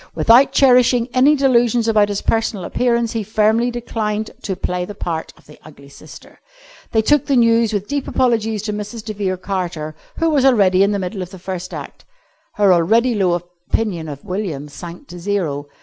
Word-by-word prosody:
Without 245 +4 +5
cherishing 250 -2 +4
any 270 +4 +5
delusions 240 -4 +2
about 210 -2 +3
his 205 -1 -3
personal 220 -4 -1
appearance, 235 0 0
he 225 - -2
firmly 220 +3 +1
declined 220 -3 -3
to 195 - -3
play 180 0 -3
the 205 +3 -8
part 165 -4 -4
of - - -23
the 150 - -16
ugly 140 -2 -15
sister. - - -15 0.5
They 220 -1 +2
took 295 +4 +2
the 275 - +2
news 230 -2 +3
with 205 -1 -3
deep 285 -1 -3
apologies 225 -4 0
to 210 -1 -3
Mrs. 210 +2 -6
de 215 - -4
Vere 195 -2 -2
Carter, 175 -5 -4 0.2
who 330 -1 +1
was 285 -4 +2
already 200 -8 +4
in 200 +1 +3
the 205 - 0
middle 195 +1 -4
of 180 - -6
the 190 - -11
first 185 0 -6
act. - - -9 0.5
Her 200 -3 +4
already 225 +9 +3
low 190 -5 +1
opinion 175 0 -4
of 140 -1 -9
William 180 -7 -4
sank 175 - -10
to 175 - -9
zero. 170 -7 -2
210 Hz, 190 wpm, -18 LUFS, 180-235 Hz, 0.5 s, Without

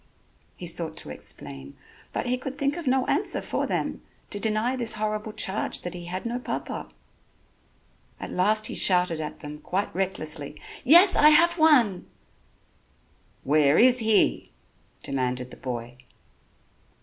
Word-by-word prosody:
He 180 - -7
sought 165 -2 -3
to - - -4
explain, 70 -2 -9 0.3
but - - -3
he 250 +1 0
could 265 +1 -7
think 280 +1 0
of 340 -5 -7
no 260 0 +2
answer - - 0
for - - -3
them, - - -3 0.3
to 205 - -2
deny 220 +4 0
this 235 -4 +3
horrible 215 0 -3
charge 195 -1 -1
that 175 - -6
he 175 -1 -8
had 185 +4 -6
no 240 +1 -3
papa. - - -5 1.3
At - - -7
last 215 +4 +2
he - - 0
shouted 180 -3 +2
at 155 -1 -6
them 150 0 -8
quite 195 +6 -3
recklessly: 155 -6 -4 0.2
"Yes, 345 +8 +7
I 300 - +7
have 340 +3 +4
one." 250 - +4 1.4
"Where 145 +1 +3
is 250 +1 +5
he?" 220 - +2 0.5
demanded 125 -1 -3
the - - -12
boy. 120 -1 -6
195 Hz, 145 wpm, -25 LUFS, 155-250 Hz, 1.4 s, Yes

